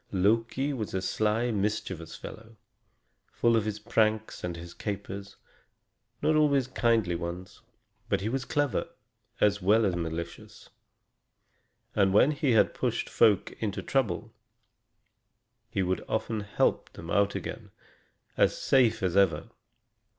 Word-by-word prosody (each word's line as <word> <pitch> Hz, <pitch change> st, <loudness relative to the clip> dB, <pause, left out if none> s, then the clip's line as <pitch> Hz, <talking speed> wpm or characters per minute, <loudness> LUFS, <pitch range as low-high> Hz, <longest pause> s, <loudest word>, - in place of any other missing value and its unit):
Loki 115 Hz, +8 st, +1 dB
was 110 Hz, -7 st, -4 dB
a -, -, +1 dB
sly, 110 Hz, +5 st, 0 dB
mischievous 100 Hz, -5 st, -2 dB
fellow, 110 Hz, 0 st, -11 dB, 0.7 s
full 115 Hz, -1 st, +2 dB
of 110 Hz, -2 st, +1 dB
his 105 Hz, -1 st, -2 dB
pranks 110 Hz, 0 st, 0 dB
and 90 Hz, -1 st, -3 dB
his 85 Hz, +1 st, -9 dB
capers, 100 Hz, -1 st, -6 dB, 0.9 s
not 155 Hz, -, +3 dB
always 145 Hz, -4 st, +3 dB
kindly 115 Hz, -7 st, +1 dB
ones. 85 Hz, +3 st, -6 dB, 0.5 s
But 100 Hz, -2 st, +1 dB
he 100 Hz, -, -2 dB
was 130 Hz, +3 st, -1 dB
clever, 145 Hz, 0 st, 0 dB, 0.5 s
as 105 Hz, -1 st, +3 dB
well 105 Hz, +4 st, +4 dB
as 95 Hz, -3 st, +1 dB
malicious; 85 Hz, 0 st, -6 dB, 1.2 s
and 100 Hz, -2 st, +2 dB
when 135 Hz, +7 st, +6 dB
he 145 Hz, -4 st, +1 dB
had 110 Hz, -, +4 dB
pushed -, -, -2 dB
folk 105 Hz, -4 st, +3 dB
into 105 Hz, -2 st, -3 dB
trouble, 115 Hz, -11 st, -1 dB, 1.4 s
he 100 Hz, -5 st, 0 dB
could 95 Hz, +1 st, -1 dB
often 110 Hz, 0 st, -1 dB
help 105 Hz, -1 st, 0 dB
them 85 Hz, 0 st, -8 dB
out 100 Hz, +1 st, +2 dB
again, -, -, -6 dB, 0.7 s
as -, -, +3 dB
safe 120 Hz, -6 st, +3 dB
as 90 Hz, -1 st, 0 dB
ever. 95 Hz, -6 st, +2 dB
105 Hz, 130 wpm, -28 LUFS, 95-115 Hz, 1.4 s, when